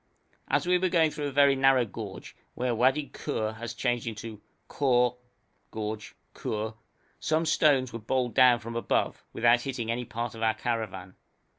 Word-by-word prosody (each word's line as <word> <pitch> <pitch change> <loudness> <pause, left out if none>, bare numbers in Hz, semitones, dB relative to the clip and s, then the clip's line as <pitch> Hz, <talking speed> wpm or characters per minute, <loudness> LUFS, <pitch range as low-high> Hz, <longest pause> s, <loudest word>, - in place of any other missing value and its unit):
As - - +1
we 180 0 +3
were 185 0 +1
going 165 -3 +3
through 150 -1 -3
a - - -4
very 140 0 +5
narrow 135 -2 +4
gorge, 100 - -8 0.2
where 125 -1 -1
Wadi 130 +4 +2
Khur 110 -7 -3
has 120 +1 -6
changed 120 -2 -1
into 110 -1 -6 0.3
Khor 125 -3 +2 0.5
(gorge) 110 0 -5 0.2
Khur, 110 +1 -3 0.5
some 160 +1 +1
stones 140 -6 +3
were 115 - -4
bowled 120 +1 -1
down 125 +1 +6
from 115 0 -8
above, 115 - -1
without 120 +1 +3
hitting 120 -4 -3
any 120 +1 -2
part 115 +1 -4
of 115 - -9
our 110 -1 +2
caravan. 105 -6 -3
120 Hz, 165 wpm, -28 LUFS, 115-135 Hz, 0.5 s, down